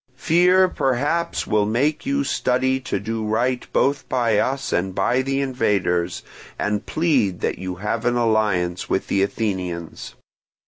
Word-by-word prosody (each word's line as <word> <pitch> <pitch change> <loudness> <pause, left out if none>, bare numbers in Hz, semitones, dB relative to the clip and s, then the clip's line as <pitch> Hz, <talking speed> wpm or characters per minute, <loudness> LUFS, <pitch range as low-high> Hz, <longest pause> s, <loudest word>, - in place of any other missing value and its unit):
"Fear 180 +5 +4
perhaps 145 +4 -1
will 105 -1 +1
make 145 - 0
you 280 0 +1
study 130 - 0
to 130 - -3
do 110 +1 -3
right 120 +4 -1
both 140 0 +1
by 115 -5 +2
us 135 +4 -1
and 95 +1 -1
by 120 +6 +2
the 135 +1 -1
invaders, 100 -9 0 0.3
and 105 0 -2
plead 130 - +1
that - - -2
you 95 -1 -4
have 105 +5 -3
an 120 0 +2
alliance 105 -7 0
with 95 - -1
the 100 - +2
Athenians. 95 -5 -3
115 Hz, 145 wpm, -22 LUFS, 100-135 Hz, 0.3 s, Fear